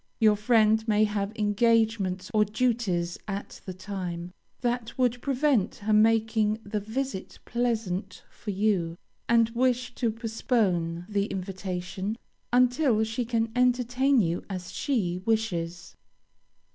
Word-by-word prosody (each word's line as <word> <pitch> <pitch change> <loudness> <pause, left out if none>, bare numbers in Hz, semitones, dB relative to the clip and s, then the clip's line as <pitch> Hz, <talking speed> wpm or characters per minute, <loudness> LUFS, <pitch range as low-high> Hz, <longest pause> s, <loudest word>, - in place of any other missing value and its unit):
Your 215 -2 +5
friend 220 0 +3
may 215 -1 +4
have 205 -1 -1
engagements 210 -2 +1
or 215 -1 +5
duties 210 -6 0
at 200 0 -6
the 185 - -4
time, 180 -3 -5 0.3
that 240 -2 -2
would 245 -1 +1
prevent 270 -6 +1
her 215 +1 -1
making 220 0 +3
the 210 +1 -2
visit 220 0 -4
pleasant 215 -6 -2
for 215 - -10
you, 190 -4 0 0.3
and 230 -1 +4
wish 250 +1 0
to 240 -2 0
postpone 215 -7 -1
the 200 -1 0
invitation 190 +1 -4 0.3
until 245 -1 +3
she 225 +3 -2
can 225 -1 0
entertain 250 +2 +3
you 170 -4 0
as 180 -2 -5
she 190 -11 -1
wishes. 180 -6 -2
215 Hz, 120 wpm, -27 LUFS, 190-235 Hz, 0.3 s, Your